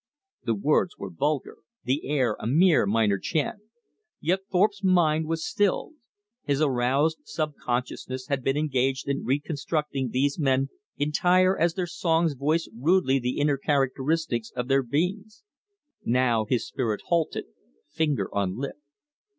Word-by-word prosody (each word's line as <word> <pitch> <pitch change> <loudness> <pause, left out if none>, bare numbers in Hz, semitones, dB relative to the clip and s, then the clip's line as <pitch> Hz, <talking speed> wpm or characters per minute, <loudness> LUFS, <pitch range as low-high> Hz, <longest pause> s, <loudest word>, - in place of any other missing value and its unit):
The 115 - 0
words 150 - +1
were 100 -1 -6
vulgar, 145 - -2 0.3
the 135 +4 -1
air 130 -7 +1
a - - -4
mere 160 - +4
minor 105 -2 +2
chant. 155 - -1 0.6
Yet 180 +5 +1
Thorpe's 200 +2 +2
mind 160 -4 +3
was 165 0 -2
stilled. 205 - 0 0.5
His 140 -1 0
aroused 140 +2 +2
subconsciousness 130 -3 -3
had 135 -1 -2
been 135 +2 +1
engaged 135 -3 0
in 140 0 -1
reconstructing 145 0 -1
these 140 +6 0
men 135 -2 +2 0.3
entire 180 +5 +3
as 170 0 +1
their 185 - -1
songs 165 -2 +1
voiced 150 +3 0
rudely 135 +1 +2
the 125 0 -2
inner 145 -1 +2
characteristics 135 -3 0
of 125 -1 -2
their 135 0 +4
beings. 190 - -2 0.6
Now 120 -2 +2
his 120 +2 0
spirit 115 -6 -2
halted, 170 -2 0 0.4
finger 150 - -1
on 100 -1 -1
lip. 140 +3 -4
140 Hz, 135 wpm, -26 LUFS, 125-165 Hz, 0.6 s, mere